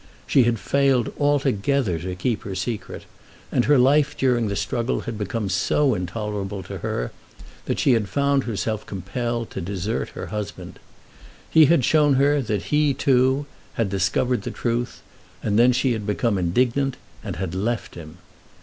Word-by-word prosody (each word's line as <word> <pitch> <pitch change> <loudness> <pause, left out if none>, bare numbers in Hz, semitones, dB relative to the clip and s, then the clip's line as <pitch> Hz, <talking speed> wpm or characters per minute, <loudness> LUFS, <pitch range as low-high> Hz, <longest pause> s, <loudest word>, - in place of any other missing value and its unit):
She 130 - +4
had 120 -1 +1
failed 135 0 +1
altogether 140 - +1
to 90 +2 -5
keep 110 +5 -1
her 95 - -6
secret, 105 +4 -4 0.5
and 120 - +2
her 145 0 +5
life 140 +4 +3
during 125 -4 +2
the 100 - -2
struggle 120 +4 -1
had 115 - -5
become 110 0 -3
so 110 +9 +2
intolerable 100 0 -4
to - - -7
her - - -3 0.5
that - - -1
she 135 - +3
had 110 -5 0
found 140 +4 +1
herself 110 -1 -2
compelled 115 +5 -3
to - - -5
desert 100 +5 -3
her - - -5
husband. 105 -1 -6 0.7
He 160 -1 +7
had 145 -5 +3
shown 150 -3 +4
her 140 +2 +3
that 105 -5 -2
he, 150 -2 +3
too, 130 +1 +2 0.3
had 115 -4 -1
discovered 120 +6 +1
the - - -5
truth, 120 +1 -3 0.4
and 105 0 +1
then 125 +2 +6
she 125 +1 +1
had 110 -3 -3
become 105 -1 0
indignant, 125 +9 +1 0.3
and - - -5
had 90 +1 -4
left 110 +5 -2
him. 80 0 -10
115 Hz, 165 wpm, -23 LUFS, 100-135 Hz, 0.7 s, He